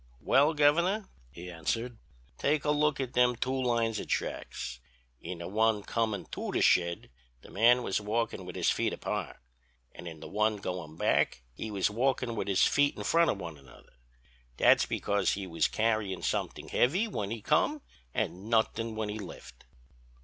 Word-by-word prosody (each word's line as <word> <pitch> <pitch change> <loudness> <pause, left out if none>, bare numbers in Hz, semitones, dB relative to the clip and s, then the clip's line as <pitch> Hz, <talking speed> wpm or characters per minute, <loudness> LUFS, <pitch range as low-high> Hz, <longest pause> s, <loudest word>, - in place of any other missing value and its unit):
"'Well, 145 - +3
Governor,' 170 +8 +3 0.2
he 85 +6 -9
answered, 115 +9 -3 0.4
'take 150 +1 +1
a 150 - +3
look 150 -1 +2
at 130 -2 -3
them 125 0 +4
two 125 +2 -2
lines 115 -3 +1
of - - -6
tracks. 60 -1 -3 0.4
In 90 - -6
the 85 - -6
one 110 +1 +1
comin' 110 -2 -1
to - - -4
the - - 0
shed 85 -6 +2 0.3
the - - -14
man 120 +4 +4
was 95 - -1
walkin' 110 -1 -2
with 90 0 -8
his - - +2
feet - - 0
apart - - -4 0.6
and 85 - -9
in 80 -2 -8
the - - -9
one 105 +1 +1
goin' 90 -5 -6
back - - +1
he 110 - -6
was 100 0 0
walkin' 125 +1 0
with 105 - -3
his 95 -2 +4
feet 145 0 +2
in - - -5
front 170 0 +3
of - - 0
one 85 -6 -7
another; 65 -3 -18 0.6
that's - - +5
because 100 -1 0
he 100 0 -4
was 85 -3 +1
carryin' 110 -4 -1
somethin' - - -2
heavy 180 - +2
when 105 - -3
he 115 +1 -4
come 275 - +1 0.3
an' 95 - -3
nothin' 115 0 +1
when 110 -1 -2
he 105 +1 -4
left.' 100 - -10
110 Hz, 180 wpm, -30 LUFS, 95-125 Hz, 0.6 s, that's